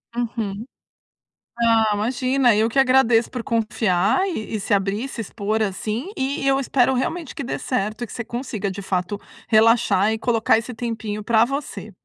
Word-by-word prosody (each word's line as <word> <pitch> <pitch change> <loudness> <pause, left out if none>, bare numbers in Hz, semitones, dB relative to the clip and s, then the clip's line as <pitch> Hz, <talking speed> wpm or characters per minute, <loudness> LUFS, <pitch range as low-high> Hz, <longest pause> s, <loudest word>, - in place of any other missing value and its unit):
Uhum. 225 -3 -3 1.0
Ah, 225 -2 +4
imagina, 250 +3 +2
eu 220 +2 +2
que 270 - +1
agradeço 255 -3 +4
por 245 -2 -5
confiar, 220 - +1
e 220 - -4
e - - -2
se 205 +2 -1
abrir, 200 +3 0
e - - -4
se 260 - -8
expor 215 0 -2
assim, 215 - -2
e 270 +1 -2
eu 270 0 +3
espero 265 -1 +2
realmente 310 +4 -3
que - - -4
dê 245 - -4
certo 215 -2 -2
e - - -4
que - - -11
você 235 - -4
consiga 225 -4 -4
de 195 +1 -6
fato 190 +1 -2 0.3
relaxar, 220 -2 +4
e - - -2
colocar 230 -2 +2
esse 235 +3 -5
tempinho 220 -2 -4
pra 225 0 +4
você. 275 -5 -5
230 Hz, 180 wpm, -22 LUFS, 215-250 Hz, 1.0 s, Ah